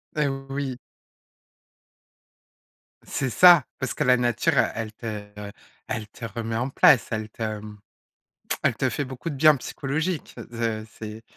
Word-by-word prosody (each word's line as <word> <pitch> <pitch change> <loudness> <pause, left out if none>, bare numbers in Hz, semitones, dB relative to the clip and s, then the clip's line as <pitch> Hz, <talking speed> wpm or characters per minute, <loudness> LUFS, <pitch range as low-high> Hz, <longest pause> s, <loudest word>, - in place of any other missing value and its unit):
Eh, 150 -2 +2 0.2
oui! 135 -2 -3 2.2
C'est 135 - -3
ça, 175 0 +7
parce 130 - -2
que - - -1
la 125 0 +5
nature, 120 -2 +1
heu, - - +6
elle 110 -1 -4
te, 115 - -12 0.3
heu, 100 0 -7 0.4
elle 105 -1 -4
te 115 - -9
remet 115 0 -4
en 125 +4 -1
place, 135 -1 +5
elle 110 -1 -3
te, 110 -1 -4
mmh, 105 0 -10 0.9
elle - - +3
te - - +1
fait 145 - -2
beaucoup 130 +5 -6
de 140 - -5
bien 155 +2 +7
psychologique. 155 +6 -3 0.2
Ze 115 -2 -2
c'est 110 0 -7
120 Hz, 155 wpm, -25 LUFS, 110-135 Hz, 2.2 s, ça